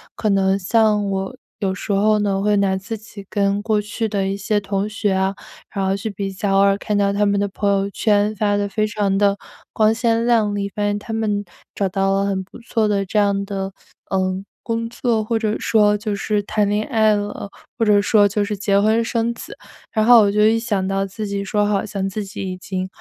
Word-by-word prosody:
可 215 - -1
能 195 -1 +2
像 210 +1 +2
我， 195 +4 -3 0.2
有 195 -3 0
时 190 - -5
候 210 +2 +3
呢， 200 -2 0
会 210 +1 +2
拿 195 -1 +2
自 220 +4 -5
己 210 -2 -12
跟 200 0 0
过 215 -1 +1
去 220 +2 -3
的 200 -2 -1
一 195 - -1
些 210 +1 0
同 200 0 -2
学 210 -1 -1
啊， 190 +1 +1 0.4
然 195 -2 -1
后 190 0 +1
去 210 +2 -4
比 200 -1 -4
较， 195 +1 -1
偶 - - +5
尔 200 0 +4
看 205 0 -2
到 200 -1 +2
他 205 +1 +2
们 200 0 +2
的 200 - +1
朋 200 +1 -2
友 195 0 +1
圈 210 0 +1
发 205 0 +1
的， 205 0 0
非 215 +2 0
常 205 -2 0
的 200 0 +3 0.4
光 215 0 +3
鲜 230 0 +1
亮 225 -4 +2
丽， 200 -1 -2
发 210 - -1
现 205 0 0
他 225 +2 -7
们 210 -2 -1 0.3
找 200 - 0
到 195 +1 +1
了 195 0 +1
很 195 -1 -1
不 190 - -14
错 230 -2 0
的 200 -1 0
这 195 - -3
样 200 -1 +1
的， 195 -1 -4 0.4
呃， 190 0 -1 0.2
工 230 0 -2
作， 235 -2 0
或 225 +1 -1
者 215 -1 0
说 210 -2 +3
就 210 0 -3
是 205 +1 -1
谈 210 0 0
恋 210 +1 0
爱 220 -4 +3
了， 205 0 -4 0.3
或 230 - +1
者 210 -1 +5
说 205 0 +4
就 205 +1 0
是 210 0 -3
结 200 0 +2
婚 220 +3 +3
生 230 0 -1
子。 230 - -10 0.4
然 215 -1 +1
后 240 -1 +8
我 200 -1 +3
就 210 +1 +2
一 225 +1 +4
想 205 -5 -1
到 195 0 0
自 200 +3 -6
己 200 0 -3
说 205 +1 0
好 205 -1 +1
像 195 -2 -3
自 205 +2 -4
己 200 +2 -8
已 185 - -6
经， 185 0 -4
205 Hz, 250 characters per minute, -20 LUFS, 195-215 Hz, 0.4 s, 后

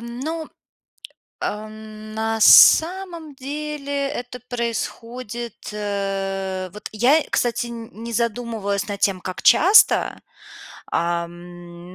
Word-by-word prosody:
ну, 275 +8 -5 0.9
ам, 215 0 -7
на 220 0 -2
самом 335 - +6
деле 285 0 -4
это 250 -3 -7
происходит, 235 -1 -4 0.2
э, 195 -2 -3
вот 210 - -8
я, 255 +9 +3
кстати, 240 0 0
н 230 -1 -8
не 235 - -6
задумывалась 225 -3 -2
над 200 0 -4
тем, 190 -2 +1
как 185 0 -6
часто, 385 +7 +5 0.7
ам, 175 +1 -4
225 Hz, 95 wpm, -22 LUFS, 200-255 Hz, 0.9 s, самом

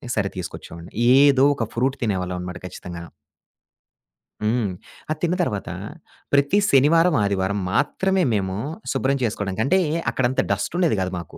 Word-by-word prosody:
సరే 100 -2 0
తీసుకొచ్చేవాడిని. 85 -1 -8 0.3
ఏదో 140 -1 +5
ఒక 115 -5 -2
ఫ్రూట్ 130 +3 0
తినేవాళ్ళమనమాట 90 -4 -3
ఖచ్చితంగాను. 85 -2 -8 1.3
హ్మ్. 110 -2 +1 0.4
అది 155 0 -2
తిన్న 175 +1 +2
తర్వాత 105 - -3 0.6
ప్రతి 140 +7 +3
శనివారం, 160 +5 +4
ఆదివారం 100 0 0
మాత్రమే 190 - +1
మేము 95 -2 -1 0.4
శుభ్రం 135 +1 +1
చేసుకోవడానికి 105 -2 -1
అంటే 185 +7 +3 0.3
అక్కడంత 130 0 +1
డస్టుండేది 155 - 0
గాదు 95 0 -2
మాకు. 85 - -11
110 Hz, 120 wpm, -22 LUFS, 95-140 Hz, 1.3 s, ఏదో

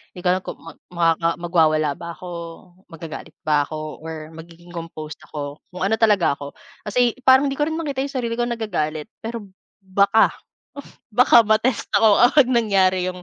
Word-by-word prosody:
'Di 180 - -8
ko - - +3
alam 185 - -1
kung - - -6
mag 165 - -12 0.2
makaka 165 -1 +1
magwawala 155 -4 +2
ba 170 0 -7
ako, 180 - -9 0.6
magagalit 160 0 -9
ba 150 -1 +3
ako, 155 -1 -7
or 160 -1 -7
magiging 170 +1 -13
composed 160 -3 -8
ako, 145 -1 -6
kung 185 +1 -3
ano 200 - +1
talaga 210 -8 +4
ako. 140 0 -8 0.3
Kasi 235 +3 +2
parang 265 +2 +6
hindi - - -2
ko 295 - +2
rin 320 - -3
makita 285 -5 -3
'yong - - -6
sarili 240 -3 -2
kong 240 0 0
nagagalit. 155 -9 -3 0.2
Pero 230 -1 -6 0.4
baka, 200 +3 +3 0.8
baka 240 +1 +6
ma-test 215 +2 +1
ako 215 -2 +5
kapag 275 -1 +4
nangyari 190 -5 +2
'yong 180 0 -6
180 Hz, 170 wpm, -21 LUFS, 160-225 Hz, 0.8 s, parang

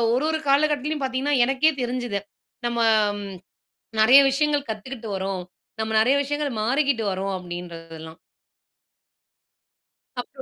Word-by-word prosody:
ஒரு 265 +4 0
ஒரு 315 - -1
காலகட்டத்திலேயும் 295 0 +1
பார்த்தீங்கன்னா, 265 +2 0
எனக்கே 270 +5 +3
தெரிஞ்சுது. 245 -4 -2 0.5
நம்ம 235 0 -2 1.2
நிறைய 250 +6 +8
விஷயங்கள் 290 0 0
கத்துக்கிட்டு 220 +1 -6
வரோம். 190 -1 -3 0.4
நம்ம 220 0 -2
நிறைய 255 +5 +3
விஷயங்கள் 290 0 -2
மாறிக்கிட்டு 265 +1 +1
வரோம். 195 +1 -3
அப்பிடின்றதெல்லாம். 165 -2 -9 2.0
அப்றோ 265 +2 -13
250 Hz, 105 wpm, -24 LUFS, 195-280 Hz, 2.0 s, நிறைய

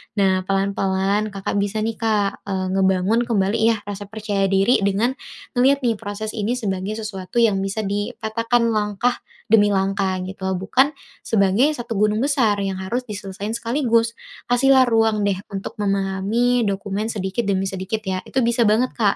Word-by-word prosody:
Nah 190 -2 +3
pelan-pelan, 195 +1 0
Kakak 195 +1 -2
bisa 205 +2 -1
nih 225 +1 -3
Kak, 210 -3 0
eee, 190 -1 -2
ngebangun 190 +4 +2
kembali 210 -1 +1
ya 225 +1 +4
rasa 205 0 -7
percaya 205 -2 -1
diri 195 +6 +3
dengan 200 +5 +1 0.4
ngeliat 270 +2 +3
nih 230 -4 +1
proses 210 +1 -5
ini 220 +3 -1
sebagai 195 -3 -3
sesuatu 215 +1 -2
yang 205 -4 +3
bisa 195 +3 -2
dipatahkan 230 +3 -1
langkah 210 +3 0 0.3
demi 205 -2 +6
langkah 195 -1 0
gitu 190 0 -9
loh, 190 - 0
bukan 260 +10 +2 0.3
sebagai 205 +5 +3
satu 235 -3 -5
gunung 210 +1 +2
besar 255 -8 +2
yang 195 -1 -2
harus 240 +7 -2
diselesaiin 200 0 -5
sekaligus. 235 -1 +1 0.4
Kasih 245 +3 +3
lah 260 - +7
ruang 225 -2 +2
deh 195 -2 0
untuk 195 -1 -5
memahami 200 +5 +1
dokumen 200 +2 -2
sedikit 195 +3 -2
demi 190 -1 +1
sedikit 190 +3 -3
ya. 190 -1 -2
Itu 260 -2 0
bisa 235 +1 +2
banget 230 +4 +2
Kak 210 -4 +2
210 Hz, 165 wpm, -21 LUFS, 195-230 Hz, 0.4 s, lah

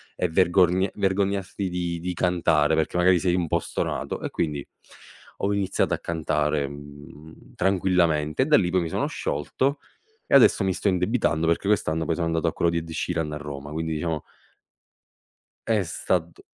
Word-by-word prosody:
e 90 - -1
vergorgn 90 +2 +3
vergognarti 100 0 -1
di 90 -1 -3
di 90 +2 -3
cantare, 80 -3 +2
perché 80 +1 -1
magari 90 0 +4
sei 90 0 +1
un 90 -2 0
po' - - +1
stonato?" - - -3
E - - -3
quindi 75 -4 -2 0.8
ho 100 +1 +1
iniziato 100 -1 0
a - - -1
cantare, 75 -3 -1
mhmm, 70 +2 -13
tranquillamente 85 -4 +1
e - - -2
da 150 - +4
lì 90 -10 +3
poi 90 0 +1
mi 80 - -4
sono - - -1
sciolto 135 - -2 0.5
e - - +3
adesso 120 -5 +6
mi 95 - +1
sto 100 - -2
indebitando 90 -3 +1
perché 85 +4 +1
quest'anno 80 -6 +1
poi 80 - 0
sono 85 0 -1
andato 80 0 0
a 80 - 0
quello 85 - +1
di 85 - -1
Ed 85 0 -4
Sheeran 80 -2 -2
a - - -3
Roma, 75 -1 -7
quindi 80 +1 -3
diciamo 80 0 -2 1.4
è 110 -3 +2
stat 85 0 -2
85 Hz, 175 wpm, -25 LUFS, 80-95 Hz, 1.4 s, adesso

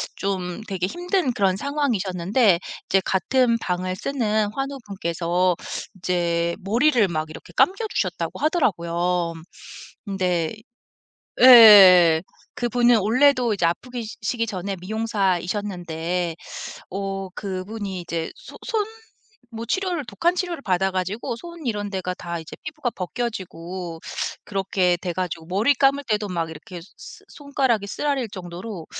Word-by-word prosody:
좀 190 0 -3
되게 185 -1 -1
힘든 350 - -1
그런 195 -4 +1
상황이셨는데 210 - +1 0.3
이제 195 0 +3
같은 235 +5 +2
방을 185 -1 -2
쓰는 215 -6 0
환우분께서 185 -9 -1 0.4
이제 170 -2 0
머리를 235 +4 +3
막 155 -1 -2
이렇게 155 - -11
감겨 395 +5 +3
주셨다고 - - -2
하더라고요. 175 - 0 0.7
근데 180 -3 -1 0.9
예예예 195 -9 +10 0.3
그분은 240 0 +3
원래도 250 +2 +3
이제 175 - 0
아프기 245 +7 -4 0.2
시기 230 +2 -1
전에 195 0 -4
미용사이셨는데 180 -4 -2 0.6
어 195 0 -4
그분이 195 0 -5
이제 170 -1 -4
소 - - -13
손 445 -4 0 0.7
뭐 230 0 -6
치료를 360 - -1
독한 345 +8 0
치료를 355 -4 -3
받아 190 0 +1
가지고 190 +6 -3
손 340 +1 -10
이런 205 -3 -2
데가 185 -2 -3
다 170 -1 -5
이제 160 - -10
피부가 300 -5 -3
벗겨지고 180 -4 -5 0.5
그렇게 190 -2 +1
돼 175 -2 -3
가지고 170 -3 -4
머리 210 +10 +3
감을 275 +2 +3
때도 210 -1 +1
막 170 -3 -2
이렇게 170 +2 -9 0.2
스 - - -12
손가락이 265 -8 -1
쓰라릴 275 +1 -1
정도로 180 0 -7
195 Hz, 285 characters per minute, -23 LUFS, 180-240 Hz, 0.9 s, 예예예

